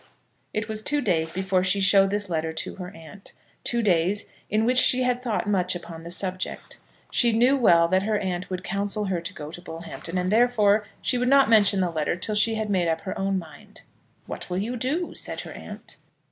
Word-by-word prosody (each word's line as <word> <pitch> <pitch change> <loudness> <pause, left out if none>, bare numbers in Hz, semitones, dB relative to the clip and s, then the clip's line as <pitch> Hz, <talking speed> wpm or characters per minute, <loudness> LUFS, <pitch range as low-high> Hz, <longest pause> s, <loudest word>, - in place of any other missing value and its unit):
It 215 +1 -3
was 215 -1 -2
two 295 +6 +1
days 165 - 0
before 190 0 0
she 185 +2 +2
showed 195 0 +5
this 205 0 -1
letter 160 -2 -2
to - - -4
her 180 -2 -6
aunt 165 +5 -13 0.3
two 235 -1 0
days 185 +1 +1 0.2
in 215 +1 +1
which 250 +1 +4
she 255 0 +4
had 250 0 0
thought 230 -4 -2
much 185 -3 +1
upon 170 -1 -8
the 170 - -9
subject. 185 +1 -3 0.3
She 240 -2 +3
knew 250 +4 +4
well 170 -10 +5
that 185 +1 +3
her 210 +1 0
aunt 185 -2 -3
would 185 -1 -4
counsel 205 +2 -1
her 185 -3 -1
to 170 +2 -5
go 150 -1 -7
to 175 - -9
Bullhampton, 170 +1 -7
and, 180 +1 0
therefore, 215 -3 +3 0.2
she 250 - 0
would 250 0 +1
not 275 -3 +5
mention 205 -3 +5
the 180 -2 0
letter 155 0 -1
till 215 +4 -3
she 215 +2 +2
had 220 -1 -2
made 185 -4 +1
up 160 0 0
her 190 - -5
own 195 0 -1
mind. 165 -4 -11 0.4
"What - - -6
will 180 +1 -1
you 230 +5 -3
do?" 285 +9 -2
said - - -3
her - - -9
aunt. - - -9
195 Hz, 215 wpm, -25 LUFS, 175-220 Hz, 0.4 s, showed